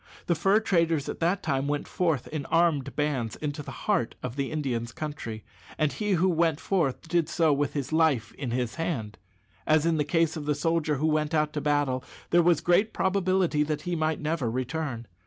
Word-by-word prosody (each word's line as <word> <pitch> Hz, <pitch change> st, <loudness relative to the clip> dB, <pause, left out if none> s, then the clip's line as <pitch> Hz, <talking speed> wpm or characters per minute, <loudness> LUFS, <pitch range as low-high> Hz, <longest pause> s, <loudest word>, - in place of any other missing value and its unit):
The 175 Hz, -, +2 dB
fur 195 Hz, +6 st, +3 dB
traders 165 Hz, -8 st, +1 dB
at -, -, -5 dB
that 175 Hz, +4 st, +1 dB
time 140 Hz, -3 st, 0 dB
went 145 Hz, 0 st, -2 dB
forth 165 Hz, -8 st, 0 dB
in 150 Hz, -3 st, -4 dB
armed 165 Hz, -5 st, +2 dB
bands 135 Hz, -7 st, -1 dB
into 150 Hz, -1 st, -4 dB
the -, -, -9 dB, 0.2 s
heart 200 Hz, -, +1 dB
of 125 Hz, -1 st, -4 dB
the 140 Hz, -1 st, -2 dB
Indians' 120 Hz, -7 st, -2 dB
country, 115 Hz, -8 st, -6 dB, 0.3 s
and 155 Hz, -2 st, +1 dB
he 210 Hz, -2 st, -1 dB
who 180 Hz, +1 st, +3 dB
went 165 Hz, -3 st, +2 dB
forth 165 Hz, -6 st, -1 dB
did 165 Hz, -1 st, +1 dB
so 160 Hz, -3 st, +3 dB
"with 145 Hz, 0 st, 0 dB
his 140 Hz, 0 st, -3 dB
life 155 Hz, -8 st, +2 dB
in 135 Hz, -4 st, -5 dB
his 125 Hz, +1 st, -2 dB
hand." 110 Hz, -, -3 dB, 0.5 s
As 155 Hz, 0 st, +4 dB
in 165 Hz, -1 st, +2 dB
the 150 Hz, -, +2 dB
case 165 Hz, +1 st, +1 dB
of 150 Hz, -2 st, -6 dB
the 150 Hz, -, +2 dB
soldier 160 Hz, 0 st, +1 dB
who 145 Hz, +3 st, -1 dB
went 155 Hz, 0 st, +1 dB
out 150 Hz, -1 st, +1 dB
to 150 Hz, -, -2 dB
battle, 145 Hz, -3 st, +1 dB, 0.3 s
there 175 Hz, -, +6 dB
was 170 Hz, -2 st, +3 dB
great 200 Hz, +5 st, +3 dB
probability 185 Hz, -4 st, +1 dB
that 150 Hz, 0 st, -1 dB
he 175 Hz, +1 st, -2 dB
might 155 Hz, -1 st, 0 dB
never 150 Hz, -5 st, -1 dB
return. 130 Hz, 0 st, -3 dB
155 Hz, 205 wpm, -27 LUFS, 140-165 Hz, 0.5 s, there